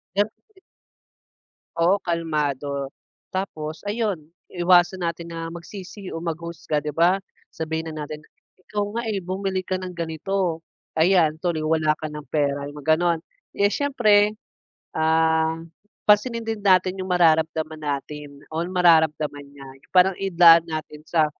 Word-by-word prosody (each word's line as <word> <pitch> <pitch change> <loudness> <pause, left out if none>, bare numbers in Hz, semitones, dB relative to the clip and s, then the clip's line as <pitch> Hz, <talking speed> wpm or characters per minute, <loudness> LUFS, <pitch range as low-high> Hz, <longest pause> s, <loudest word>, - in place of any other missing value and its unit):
meron 205 +1 +2
ka - - -51 0.2
din 380 - -21 1.2
Oo, 180 +4 +3
kalmado. 145 -5 -2 0.4
Tapos 160 -3 -5
ayun, 205 -7 -2 0.2
iwasan 175 0 +3
natin 170 0 -4
na 165 0 -6
magsisi 190 +2 -9
o - - -5
mag-husga, 165 -2 -3
'di 150 - -4
ba. 180 +4 +3 0.3
Sabihin 160 0 -3
na 150 -1 -5
natin, 150 +1 -8 0.4
"Ikaw 205 -1 -2
nga, - - 0
eh, 205 -3 -2
bumili 190 +1 -2
ka 185 0 -2
ng 185 -1 -6
ganito. 170 +1 -2 0.4
Ayan, 160 -2 +4
tuloy 165 -2 -1
wala 155 -1 +2
ka 155 0 -6
ng 150 -1 -8
pera." 140 -2 0
'yong 145 +1 -9
mga 155 +2 +3
gano'n. 170 -2 +1 0.3
Eh, 200 0 +3
siyempre. 215 -7 +3 0.6
Um, 160 +1 +1 0.4
pansinin 225 +2 +3
din 220 -2 -3
natin 185 -1 +4
'yong 185 0 -5
mararamdaman 160 -2 +2
natin 145 0 -5 0.2
o 165 - 0
mararamdaman 160 -5 +3
niya, 140 -1 -12
'yong 135 - -24
parang 185 +1 +6
idaan 170 -3 +6
natin 155 -1 -6
sa, 160 -3 +3
165 Hz, 145 wpm, -23 LUFS, 155-185 Hz, 1.2 s, parang